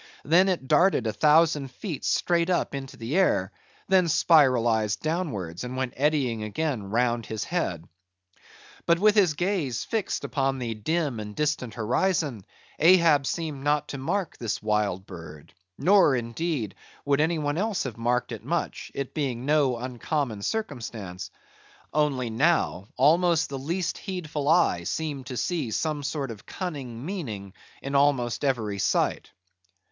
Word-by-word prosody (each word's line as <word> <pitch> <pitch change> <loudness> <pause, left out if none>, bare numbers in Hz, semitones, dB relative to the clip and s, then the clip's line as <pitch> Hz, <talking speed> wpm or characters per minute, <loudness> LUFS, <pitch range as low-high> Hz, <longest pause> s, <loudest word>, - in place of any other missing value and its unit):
Then 180 +6 +5
it 170 -8 -2
darted 175 - +4
a 110 - -1
thousand 150 0 +3
feet 155 - -6
straight 170 0 +1
up 180 - 0
into 135 -1 -6
the 115 +7 -4
air; 185 - +2 0.4
then 190 -2 +4
spiralized 120 - +3
downwards, 125 - -3
and 125 +1 -5
went 130 -1 -2
eddying 135 -5 +1
again 125 +4 -2
round 120 +2 0
his 110 -2 -3
head. 90 - -2 1.0
But 170 0 +5
with 210 +3 +4
his 190 -8 +3
gaze 170 - -1
fixed 220 -4 -2
upon 135 -2 0
the 120 -3 -3
dim 145 +3 -1
and 105 -1 -7
distant 150 -7 -1
horizon, 125 - 0 0.3
Ahab 165 -4 +5
seemed 155 -5 -3
not 150 0 +1
to 140 - -5
mark 180 +6 -2
this 115 -3 -2
wild 105 -3 0
bird; 80 -5 -11 0.2
nor, 190 -7 +5
indeed, 120 - -2 0.3
would 140 0 +2
any 165 +2 +1
one 145 +1 -1
else 210 -1 0
have 125 -5 -5
marked 120 +1 0
it - - -6
much, - - -3
it 140 -2 -4
being 130 -5 -2
no 145 -4 +2
uncommon 125 -1 -3
circumstance; 110 - -4 0.6
only 140 -5 +1
now 120 - +1
almost 165 +4 +4
the 135 -1 -4
least 170 +6 -2
heedful 155 -7 -3
eye 165 - +3
seemed 140 - -3
to 125 - -5
see 130 +3 -1
some 150 +6 -1
sort 140 -2 -3
of 105 -2 -10
cunning 135 -9 -5
meaning 110 - -5 0.3
in 135 - -4
almost 140 -4 +2
every 110 -7 0
sight. - - 0
140 Hz, 150 wpm, -26 LUFS, 115-165 Hz, 1.0 s, Then